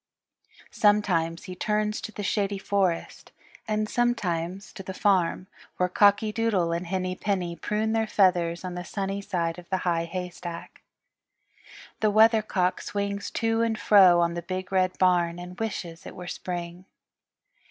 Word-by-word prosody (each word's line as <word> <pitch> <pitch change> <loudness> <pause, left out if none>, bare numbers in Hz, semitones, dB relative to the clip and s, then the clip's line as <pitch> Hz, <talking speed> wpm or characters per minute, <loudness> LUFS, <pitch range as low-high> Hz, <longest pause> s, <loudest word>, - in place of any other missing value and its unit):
Sometimes 180 -6 +2
he 185 - -7
turns 210 +2 -1
to - - -6
the 210 - -6
Shady 200 0 0
Forest, 190 -3 -1 0.4
and 215 0 0
sometimes 195 -6 -1
to - - -8
the 190 0 -7
farm, 185 -3 +2 0.3
where 180 - +2
Cocky 205 +3 +4
Doodle 210 -6 +1
and 170 +1 -2
Henny 185 0 -2
Penny 185 -4 -2
prune 210 +6 -1
their 225 0 +1
feathers 180 -4 +2
on 180 - -4
the 180 0 -5
sunny 195 +2 -3
side 175 -4 -2
of 175 - -15
the 190 -1 -2
High 170 -1 +1
Haystack. 175 -1 -7 1.2
The 215 - +3
Weathercock 215 -4 +3
swings 200 0 -3
to 225 0 0
and 225 -1 0
fro 190 -6 +6
on 170 0 +1
the 170 - -4
Big 185 +2 -5
Red 185 -1 +1
Barn 175 -2 +2
and 180 +1 -9
wishes 190 -6 -5
it - - -9
were 180 - -8
Spring. 175 0 -6
185 Hz, 150 wpm, -26 LUFS, 175-210 Hz, 1.2 s, fro